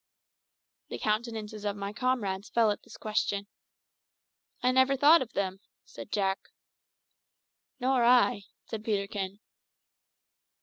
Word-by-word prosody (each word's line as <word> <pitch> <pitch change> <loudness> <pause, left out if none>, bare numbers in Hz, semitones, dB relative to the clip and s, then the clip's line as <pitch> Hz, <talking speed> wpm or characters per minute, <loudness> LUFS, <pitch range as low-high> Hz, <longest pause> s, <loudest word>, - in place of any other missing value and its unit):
The - - -4
countenances 215 -1 -2
of 205 -1 -1
my 200 0 -5
comrades 215 -5 -1
fell 225 -2 +3
at 205 - -4
this - - -13
question. 205 -2 -1 1.2
"I 250 - +4
never 260 +1 +4
thought 300 +5 +7
of 245 -2 -5
them," 190 -1 -2 0.3
said - - -11
Jack. 195 -2 +1 1.4
"Nor 255 -1 +2
I," 240 -3 +4 0.2
said 215 -1 -6
Peterkin. 200 -2 -2
215 Hz, 115 wpm, -29 LUFS, 200-245 Hz, 1.4 s, thought